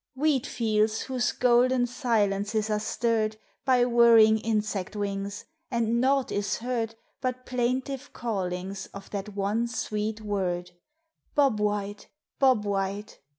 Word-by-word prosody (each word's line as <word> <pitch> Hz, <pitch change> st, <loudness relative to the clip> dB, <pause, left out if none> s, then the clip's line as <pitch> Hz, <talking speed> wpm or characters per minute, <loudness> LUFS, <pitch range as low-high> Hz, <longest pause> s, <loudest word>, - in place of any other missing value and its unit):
Wheat 285 Hz, -1 st, +1 dB
fields 220 Hz, -1 st, +1 dB
whose 255 Hz, -2 st, -1 dB
golden 250 Hz, 0 st, +3 dB
silences 220 Hz, -4 st, 0 dB
are 210 Hz, -, +1 dB
stirred 220 Hz, 0 st, 0 dB, 0.3 s
By 250 Hz, -2 st, +4 dB
whirring 230 Hz, -2 st, +6 dB
insect 215 Hz, -3 st, -2 dB
wings, 200 Hz, -1 st, -3 dB, 0.2 s
and 235 Hz, 0 st, +1 dB
naught 270 Hz, 0 st, +2 dB
is 200 Hz, -1 st, -1 dB
heard 230 Hz, -2 st, -2 dB, 0.3 s
But 255 Hz, -1 st, -3 dB
plaintive 255 Hz, +3 st, -2 dB
callings 190 Hz, -4 st, -3 dB
of 200 Hz, -1 st, -10 dB
that 200 Hz, 0 st, -5 dB
one 205 Hz, +4 st, 0 dB
sweet 215 Hz, -1 st, -3 dB
word, 185 Hz, -4 st, -2 dB, 0.6 s
"Bob 275 Hz, -7 st, +3 dB
White! 205 Hz, 0 st, -2 dB, 0.3 s
Bob 255 Hz, -6 st, +4 dB
White!" 200 Hz, +1 st, -3 dB
220 Hz, 120 wpm, -27 LUFS, 205-245 Hz, 0.6 s, whirring